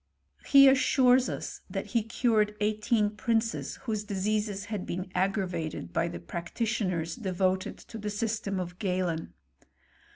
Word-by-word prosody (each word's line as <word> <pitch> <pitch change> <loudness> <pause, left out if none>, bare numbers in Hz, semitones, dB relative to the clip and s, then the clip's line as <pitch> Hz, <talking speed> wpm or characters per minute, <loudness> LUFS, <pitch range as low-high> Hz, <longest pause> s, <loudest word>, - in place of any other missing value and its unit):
He 275 -1 +8
assures 260 -1 +5
us - - -5
that - - -3
he 230 - +4
cured 215 -1 +1
eighteen 210 0 +1
princes 225 +2 -1
whose 215 -3 -2
<liseases 205 0 -1
had 210 -3 -4
been 180 +1 -4
aggravated 180 - -1
by - - +1
the 85 - -6
practitioners 170 - -2
de 195 -6 -4
voted 185 +1 0
to 225 - -10
the 210 0 -3
system 210 -2 -2
of 175 0 -6
Galen. 180 -5 -1
205 Hz, 135 wpm, -29 LUFS, 185-225 Hz, -, He